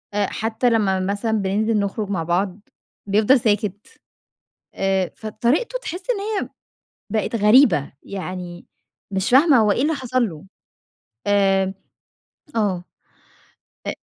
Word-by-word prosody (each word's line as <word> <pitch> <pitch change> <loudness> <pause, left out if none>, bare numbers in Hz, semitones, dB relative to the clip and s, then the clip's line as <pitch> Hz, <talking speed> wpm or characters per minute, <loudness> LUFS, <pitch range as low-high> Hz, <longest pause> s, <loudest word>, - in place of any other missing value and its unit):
حتّى 220 +4 0
لمّا 205 -5 +2
مثلًا 200 +4 -1
بننزل 215 +1 +1
نخرج 200 +1 -2
مع 180 -5 -1
بعض 180 +4 -1 0.5
بيفضل 215 +6 +4
ساكت، 205 -2 -1 0.9
آآ 190 -2 0
فطريقته 250 - -1
تحس 360 -1 -6
إن 445 - -2 0.2
هي - - -4 0.7
بقت 220 +1 0
غريبة، 210 - +4
يعني 180 -2 -7 0.5
مش 190 +1 -1
فاهمة 275 +2 +6
هو 215 -2 +4
إيه 245 - 0
اللي 315 +3 +1
حصل 255 -4 0
له؟ 155 -2 -11 0.8
آآ 195 -1 +2 0.8
آه 200 -5 0 1.0
أ - - -1
205 Hz, 115 wpm, -21 LUFS, 190-230 Hz, 1.0 s, فاهمة